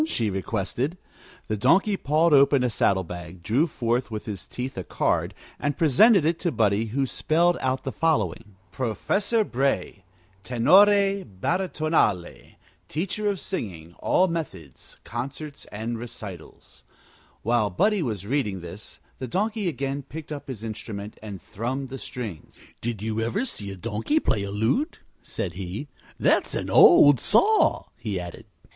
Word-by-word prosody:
she 115 - 0
requested. 110 - -2 0.5
The 110 - -2
Donkey 195 - +3
pawed 155 0 +2
open 140 -1 +5
a 125 - +1
saddle 95 -3 +2
bag, 85 0 -9
drew 125 - +2
forth 120 -3 -1
with 110 -2 -5
his 105 -4 -6
teeth 130 +2 -5
a - - -4
card, - - 0 0.2
and 145 -1 -1
presented 170 - +5
it 165 +1 +1
to 175 - 0
Buddie, 105 -2 +2
who 135 +5 0
spelled 170 +6 +2
out 130 0 -1
the 135 - -3
following: 110 - -1 0.2
PROFESSOR 195 - 0
BRAY 135 - -1 0.4
TENORE 195 - +5
BARITONALE 155 - -1 0.4
TEACHER 195 +6 -1
OF 200 -2 -2
SINGING 85 - -5
ALL 185 - +3
METHODS 100 - -6
CONCERTS 140 +5 -6
AND 115 +2 -5
RECITALS 100 -7 -9 0.6
While 115 -2 +2
Buddie 205 - +2
was 105 - -3
reading 105 -7 -1
this 85 +5 -9 0.2
the 130 - -4
Donkey 210 - -1
again 140 -3 -2
picked 155 +3 -9
up 145 -1 -6
his 120 -5 -7
instrument 110 -2 -6
and 105 -3 -7
thrummed 130 +8 -4
the 135 0 -6
strings. 110 -13 -7 0.2
"Did 115 -3 -3
you 110 0 -2
ever 195 - -1
see 105 - -5
a 95 - -6
donkey 115 - 0
play 105 - 0
a 100 - -4
lute?" 110 - 0 0.2
said 90 - -4
he. 95 - -6 0.3
"That's - - +2
an - - -3
old 145 -4 +8
saw," 415 - +4
he 105 -5 -3
added. 90 -1 -8
125 Hz, 150 wpm, -25 LUFS, 105-160 Hz, 0.6 s, old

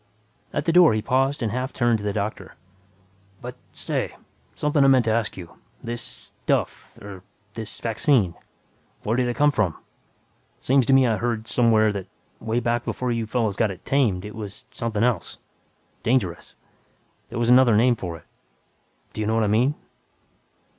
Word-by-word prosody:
At - - -2
the 165 - +2
door 175 -9 +6
he 110 - 0
paused 135 +2 +1
and 110 - -1
half 125 +2 -2
turned 120 -3 +1
to - - -8
the 105 - -1
doctor, 100 -2 -4 0.8
"But 125 +1 -8 0.2
say... - - -2 0.4
something 150 -1 +2
I - - +5
meant 130 -3 +5
to 110 - +2
ask 110 -2 -1
you. 85 -3 -11 0.2
This 120 0 -4 0.4
'stuff'... - - -1
er, 100 -2 -10 0.3
this 110 -1 -6
vaccine... 115 - +2 0.7
where 110 - 0
did 125 0 +1
it 120 - -2
come 145 0 +4
from? 100 - 0 0.8
Seems 130 -2 +2
to 135 - +4
me 135 -1 +6
I 115 -3 +1
heard 115 -2 -2
somewhere 110 -3 +3
that, 95 -2 -5 0.3
way 115 +2 -1
back 120 0 0
before 125 0 -2
you 115 -2 -2
fellows 110 -3 0
got 110 - +1
it 95 - -9
'tamed' 110 -9 +1
it 105 - -8
was 105 +2 -7
something 115 -4 -2
else 120 -7 0 0.6
dangerous. 95 -10 -1 0.7
There 120 - -6
was 120 0 +2
another 125 -4 +6
name 120 +2 +4
for 85 -6 -6
it. - - -20 0.9
Do - - -4
you 105 - -1
know 110 - +1
what 115 - +2
I - - +1
mean?" 125 +7 +2
115 Hz, 175 wpm, -24 LUFS, 105-125 Hz, 0.9 s, door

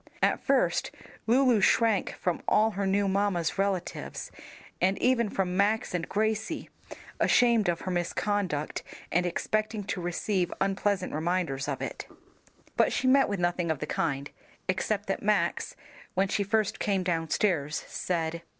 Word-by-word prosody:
At - - +3
first - - +2 0.4
Lulu 245 -2 +4
shrank 220 0 +3
from 180 -2 -2
all 220 +1 +4
her 200 -1 -2
new 200 +1 +2
mamma's 190 -3 0
relatives, 195 -2 -2 0.5
and 190 +2 +2
even 245 -3 +2
from 185 -2 -1
Max 205 +2 +1
and 175 -1 -2
Gracie, 220 +1 -1 0.5
ashamed 235 -5 +4
of 170 - -1
her 185 - -3
misconduct 180 -2 -1 0.3
and 180 +1 +2
expecting 215 +4 -1
to 190 -2 -3
receive 175 +1 -1
unpleasant 195 -1 0
reminders 155 -4 -1
of 140 -2 -3
it. - - -5 0.7
But - - +3
she - - -1
met 270 +1 +5
with 200 -2 -2
nothing 175 -1 0
of 160 - +1
the 150 - -4
kind, 145 -3 -2 0.4
except 200 +2 -1
that 195 - -2
Max, 210 0 0 0.4
when 190 +1 +2
she 205 - 0
first 205 +1 0
came 195 -3 0
downstairs, 165 -2 0
said. 170 -2 -2
195 Hz, 145 wpm, -28 LUFS, 175-210 Hz, 0.7 s, met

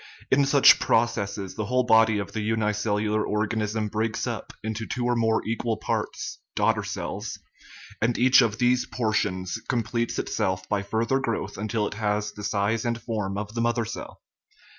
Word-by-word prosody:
In 140 +1 +4
such 140 -1 +7
processes 100 -4 0
the 110 - -3
whole 125 +1 +2
body 110 -2 +5
of 100 -1 -4
the 110 +1 -3
unicellular 105 -1 0
organism 105 0 -1
breaks 110 +1 -1
up - - -4
into 110 0 -3
two 125 -1 -2
or 120 0 +2
more 110 -1 +1
equal 115 0 -1
parts - - -3 0.2
(daughter - - +2
cells), - - -5 0.6
and 115 +1 +1
each 130 +2 +6
of 110 -3 +1
these 125 0 +2
portions 95 -6 -1
completes 120 0 -1
itself 95 0 -1
by 105 -2 0
further 115 +6 0
growth 115 -4 -3
until 110 +1 -1
it - - -4
has 105 0 -1
the 105 - -10
size 105 +3 0
and 120 -1 -1
form 105 -4 -3
of 105 +1 -5
the 115 - -1
mother 120 0 +1
cell. 110 - -8
110 Hz, 165 wpm, -26 LUFS, 105-115 Hz, 0.6 s, such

